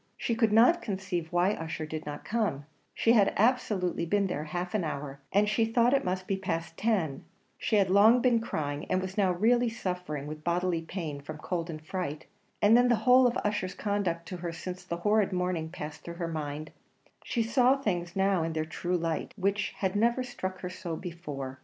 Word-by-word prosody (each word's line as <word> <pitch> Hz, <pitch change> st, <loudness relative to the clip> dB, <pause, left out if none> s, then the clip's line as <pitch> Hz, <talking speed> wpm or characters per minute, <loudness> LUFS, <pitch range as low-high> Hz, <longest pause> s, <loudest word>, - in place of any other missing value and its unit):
She 235 Hz, -, -1 dB
could 225 Hz, -2 st, +2 dB
not 245 Hz, +11 st, +6 dB
conceive 190 Hz, -5 st, -3 dB
why 175 Hz, +2 st, +3 dB
Ussher 165 Hz, -4 st, -4 dB
did 155 Hz, 0 st, -6 dB
not 145 Hz, -, -6 dB
come 205 Hz, -11 st, -1 dB, 0.3 s
she 230 Hz, -, +3 dB
had 210 Hz, -4 st, +4 dB
absolutely 210 Hz, -7 st, +1 dB
been 200 Hz, +4 st, +1 dB
there 155 Hz, -5 st, -3 dB
half 175 Hz, +3 st, -4 dB
an 210 Hz, -4 st, +1 dB
hour, 140 Hz, -3 st, -4 dB
and 205 Hz, +2 st, +3 dB
she 215 Hz, +2 st, +2 dB
thought 235 Hz, +2 st, +3 dB
it 275 Hz, -, +3 dB
must 185 Hz, 0 st, -2 dB
be 195 Hz, -1 st, -1 dB
past 165 Hz, -4 st, -3 dB
ten 185 Hz, -11 st, 0 dB, 0.3 s
she 220 Hz, -, -1 dB
had 195 Hz, -3 st, +3 dB
long 215 Hz, +5 st, +7 dB
been 240 Hz, -2 st, +3 dB
crying, 150 Hz, -10 st, -3 dB
and 185 Hz, -, +2 dB
was 190 Hz, 0 st, -5 dB
now 195 Hz, -3 st, +3 dB
really 235 Hz, +6 st, +3 dB
suffering 180 Hz, -9 st, -4 dB
with 155 Hz, +1 st, -7 dB
bodily 175 Hz, 0 st, 0 dB
pain 160 Hz, -4 st, -5 dB
from 150 Hz, +2 st, -7 dB
cold 170 Hz, +2 st, -3 dB
and 155 Hz, -1 st, -7 dB
fright; 160 Hz, -4 st, -4 dB, 0.4 s
and 210 Hz, +2 st, +7 dB
then 245 Hz, +1 st, +5 dB
the 240 Hz, -, +4 dB
whole 255 Hz, 0 st, +7 dB
of 240 Hz, -, 0 dB
Ussher's 195 Hz, -2 st, -1 dB
conduct 190 Hz, -5 st, -1 dB
to 185 Hz, -, -5 dB
her 170 Hz, -1 st, -4 dB
since 180 Hz, +2 st, -6 dB
that 170 Hz, -, -3 dB
horrid 210 Hz, +1 st, +3 dB
morning 180 Hz, -3 st, -1 dB
passed 150 Hz, -2 st, -7 dB
through 170 Hz, -, -8 dB
her 170 Hz, -1 st, -3 dB
mind 155 Hz, -1 st, -4 dB, 0.5 s
she 235 Hz, -, 0 dB
saw 250 Hz, +3 st, +4 dB
things 175 Hz, -8 st, -2 dB
now 195 Hz, -2 st, +2 dB
in 165 Hz, 0 st, -2 dB
their 155 Hz, 0 st, -1 dB
true 175 Hz, +3 st, -2 dB
light, 165 Hz, -2 st, -2 dB
which 200 Hz, +1 st, 0 dB
had 190 Hz, 0 st, -1 dB
never 235 Hz, +4 st, +2 dB
struck 190 Hz, -7 st, -5 dB
her 180 Hz, -, -4 dB
so 175 Hz, -2 st, -5 dB
before. 145 Hz, -7 st, -6 dB
185 Hz, 205 wpm, -29 LUFS, 165-210 Hz, 0.5 s, long